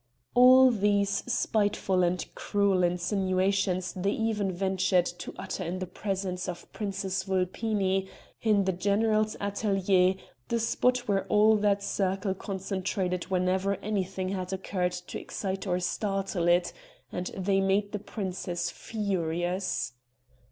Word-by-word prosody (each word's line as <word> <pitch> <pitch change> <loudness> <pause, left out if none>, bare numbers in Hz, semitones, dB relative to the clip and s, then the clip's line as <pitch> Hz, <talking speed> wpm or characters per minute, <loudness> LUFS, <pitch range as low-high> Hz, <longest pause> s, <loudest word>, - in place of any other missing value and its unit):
All 255 +1 +8
these 200 -2 +1
spiteful 205 -5 +1
and 180 +1 +1
cruel 200 -2 +1
insinuations 185 +1 +1
they 195 +1 -1
even 215 -4 0
ventured 190 -1 +1
to 175 0 -6
utter - - -4
in 175 +3 -3
the 185 - -3
presence 185 -1 -3
of 175 - -8
Princess 195 -2 -3
Vulpini, 190 0 0 0.3
in 210 -3 +3
the 190 - +1
general's 215 +3 +1
atelier, 195 -2 +2 0.3
the 235 - 0
spot 250 +2 +1
where 195 -2 0
all 215 +1 +5
that 205 -1 +1
circle 195 0 0
concentrated 190 -1 -3
whenever 185 +2 +1
anything 190 -2 -2
had 185 -1 -3
occurred 185 -1 -1
to 180 0 -6
excite 195 0 -4
or 180 -1 +1
startle 195 -1 -1
it, 175 0 +3 0.4
and 180 0 -3
they 195 +1 +2
made 200 +1 +1
the 210 - -3
princess 185 -4 -4
furious. 185 - -2
195 Hz, 125 wpm, -28 LUFS, 185-205 Hz, 0.4 s, All